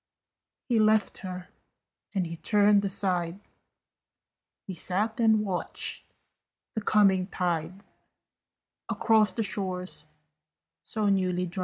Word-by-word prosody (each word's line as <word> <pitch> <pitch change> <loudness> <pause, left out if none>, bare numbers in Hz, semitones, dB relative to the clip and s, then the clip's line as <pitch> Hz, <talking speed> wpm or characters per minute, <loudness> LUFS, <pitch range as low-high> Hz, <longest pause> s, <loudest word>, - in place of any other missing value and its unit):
He 240 -4 +2
left 215 -1 +2
her, 180 -1 -7 0.7
and 190 -2 +1
he 165 0 -6
turned 205 +3 +3
aside: 185 -2 0 1.3
He 190 - -6
sat 200 +6 -1
and 220 -2 +3
watched 185 -3 -2 0.6
the 220 - -3
coming 195 -3 +3
tide 180 0 -3 1.1
Across 215 -4 +3
the 225 - -1
shores 185 -2 -4 0.8
so 215 -2 -2
newly 185 -2 +1
dried. 180 +2 -6
195 Hz, 105 wpm, -27 LUFS, 180-210 Hz, 1.3 s, turned